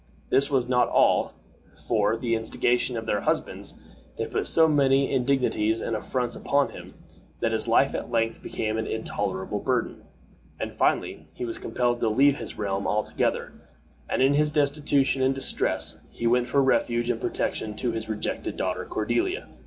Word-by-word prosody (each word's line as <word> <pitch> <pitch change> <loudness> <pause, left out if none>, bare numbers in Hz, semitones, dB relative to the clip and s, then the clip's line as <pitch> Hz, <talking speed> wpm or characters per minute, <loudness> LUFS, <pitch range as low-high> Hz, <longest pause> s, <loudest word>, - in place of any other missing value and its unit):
This 140 +2 +3
was 130 -4 +1
not 125 -1 +2
all; - - +3 0.6
for, 105 -2 +2
at 115 - -4
the 120 -2 0
instigation 120 +2 0
of 115 - -4
their 105 -2 0
husbands, - - -2 0.4
they - - -1
put - - -2
so 160 -1 +5
many 140 -2 +3
indignities 125 -4 +1
and 115 - -2
affronts 125 +3 -2
upon 140 0 +1
him, - - -11 0.4
that 115 - 0
his 110 +1 -1
life 125 +4 +3
at - - -4
length 115 -1 0
became 110 0 -2
an 110 - -2
intolerable 105 -2 -3
burden, 125 +1 -1 0.6
and - - -4
finally 75 - 0
he - - -4
was 115 - -5
compelled 120 +1 0
to 115 - +1
leave 140 +5 +4
the - - -6
realm 100 -1 -2
altogether, 105 +1 -1 0.6
and - - +2
in 135 +2 +4
his 150 +1 +3
destitution 145 -2 +1
and 135 +1 +2
distress 135 - 0
he 115 - -6
went 120 +1 +3
for 140 +2 +3
refuge 120 -2 +1
and 115 - -4
protection 105 -1 -2
to 120 +2 -1
his 110 -1 -5
rejected 110 -1 -3
daughter - - -2
Cordiella. 360 - -1
120 Hz, 170 wpm, -26 LUFS, 110-135 Hz, 0.6 s, so